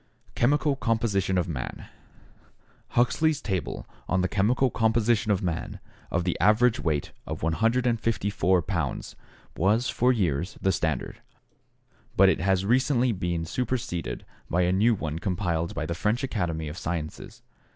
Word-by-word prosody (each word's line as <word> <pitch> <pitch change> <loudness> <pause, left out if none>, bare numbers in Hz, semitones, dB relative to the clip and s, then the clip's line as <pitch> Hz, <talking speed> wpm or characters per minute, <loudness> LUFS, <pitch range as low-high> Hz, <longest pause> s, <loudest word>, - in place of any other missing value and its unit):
Chemical 145 +3 +2
Composition 110 -6 0
of 90 - +1
Man 70 -8 -5 1.1
Huxley's 140 +6 +3
table 95 - -3 0.2
on 90 0 +2
the 90 - +1
chemical 115 +7 +2
composition 110 -1 +2
of 100 0 +1
man 85 -2 -3 0.3
of 85 - 0
the 90 -1 0
average 110 +4 +4
weight 75 -4 -1 0.2
of - - -5
154 110 -1 +1
pounds - - -3 0.4
was 110 +8 +2
for 125 +2 +3
years 90 - -1
the 95 - +2
standard, 80 -7 -2 1.0
but - - +7
it - - +1
has 95 +1 +2
recently 125 +2 +3
been 85 -4 -2
superseded 115 -4 -3 0.2
by 90 +2 +2
a 90 - +2
new 110 +5 +3
one 80 -4 -4
compiled 85 -3 -1
by 80 -1 -2
the 85 - -2
French 105 - 0
Academy 85 - -2
of 75 +3 -6
Sciences. 80 -3 -5
95 Hz, 140 wpm, -26 LUFS, 85-115 Hz, 1.1 s, but